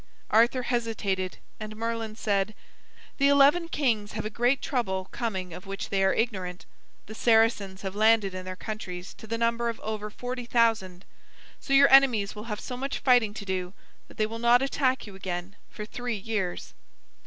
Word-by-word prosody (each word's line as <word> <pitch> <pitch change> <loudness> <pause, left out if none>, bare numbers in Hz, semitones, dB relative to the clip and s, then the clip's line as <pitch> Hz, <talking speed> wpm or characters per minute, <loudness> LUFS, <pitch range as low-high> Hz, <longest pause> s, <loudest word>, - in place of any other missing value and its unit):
Arthur 240 +3 +4
hesitated 220 -6 -2 0.2
and 215 0 -7
Merlin 225 -1 -3
said: 205 -2 -1 0.6
"The 280 - +5
eleven 285 +5 +5
kings 225 -9 0
have 215 0 -4
a 215 - -3
great 245 +5 +2
trouble 190 -8 -2
coming 190 -7 -3
of 180 +3 -10
which 195 0 -5
they 195 -1 +1
are 190 - +4
ignorant. 190 -6 -2 0.4
The 220 - -9
Saracens 220 -4 +2
have 190 -1 -4
landed 215 -2 +4
in 185 0 -5
their 185 0 -6
countries 185 -3 -6
to 220 - -13
the 230 +1 -2
number 235 0 +1
of 230 - -5
over 215 -1 -4
forty 245 +3 -5
thousand. 220 -7 +1 0.5
So 275 - -3
your 275 0 +6
enemies 245 -7 +5
will 210 +1 -8
have 210 -2 -4
so 250 - -6
much 270 +2 -3
fighting 245 -5 +3
to 200 - -7
do 185 -1 -3 0.3
that - - -17
they 215 - +2
will 225 +1 -6
not 240 +2 +5
attack 260 -1 0
you 205 - -11
again 185 0 -5
for 210 - -7
three 245 +1 -4
years." 195 -3 -3
220 Hz, 180 wpm, -27 LUFS, 195-240 Hz, 0.6 s, your